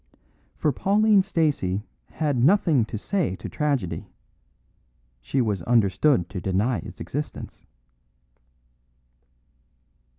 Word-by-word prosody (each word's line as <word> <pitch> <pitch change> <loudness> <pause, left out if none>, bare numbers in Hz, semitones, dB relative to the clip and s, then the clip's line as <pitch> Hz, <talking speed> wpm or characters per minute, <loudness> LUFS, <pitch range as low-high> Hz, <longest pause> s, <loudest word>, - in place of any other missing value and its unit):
For 150 - +1
Pauline 205 - +3
Stacey 150 - 0 0.3
had 150 -3 -1
nothing 160 - +4
to 115 - -6
say 175 - -1
to - - -8
tragedy; 140 - -2 1.1
she 130 - -1
was 105 -6 -1
understood 110 - +2
to 95 - -5
deny 100 +7 0
its - - -10
existence. 145 +1 -6
135 Hz, 95 wpm, -24 LUFS, 100-160 Hz, 1.1 s, nothing